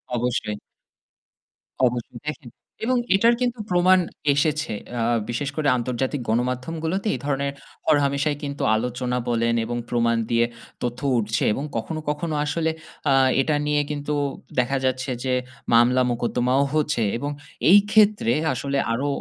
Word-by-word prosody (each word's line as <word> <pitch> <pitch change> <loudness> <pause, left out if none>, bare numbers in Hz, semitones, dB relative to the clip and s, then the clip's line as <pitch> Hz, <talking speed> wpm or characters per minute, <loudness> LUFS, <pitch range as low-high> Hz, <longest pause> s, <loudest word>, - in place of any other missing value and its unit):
অবশ্যই। 120 -3 -1 1.3
অবশ্যই, 120 -1 -2
দেখেন 150 -5 -5 0.4
এবং 255 +1 +2 0.2
এটার 230 +4 +4
কিন্তু 245 -1 0
প্রমাণ 185 +1 +5 0.3
এসেছে 150 -1 0 0.2
অ্যা 120 -2 -2 0.3
বিশেষ 135 +4 -2
করে 155 -2 0
আন্তর্জাতিক 125 +3 -2
গণমাধ্যমগুলোতে 155 - -1
এই - - -6
ধরনের 140 -1 -1 0.3
হরহামেশাই 145 -1 +2
কিন্তু 140 -1 -4
আলোচনা 125 +2 -2
বলেন 115 0 +1
এবং 120 +1 -3
প্রমাণ 115 -1 +2
দিয়ে 115 0 +4 0.4
তথ্য 120 0 -2 0.2
উঠছে 110 0 0
এবং 135 - -3
কখনো, 155 +8 -3
কখনো 155 +1 -2
আসলে 160 +2 0 0.4
আ - - +5 0.3
এটা 150 +2 +1
নিয়ে 150 0 +2
কিন্তু 145 0 -3 0.5
দেখা 125 +2 +1
যাচ্ছে 130 +1 -1
যে 130 -1 0 0.4
মামলা-মোকদ্দমাও 125 +2 +3
হচ্ছে। 150 -6 +1
এবং 145 +4 -3 0.4
এই 200 +3 +9
ক্ষেত্রে 210 - +4 0.2
আসলে 140 +2 -2 0.2
আরো 135 +5 -1
135 Hz, 130 wpm, -23 LUFS, 120-155 Hz, 1.3 s, এই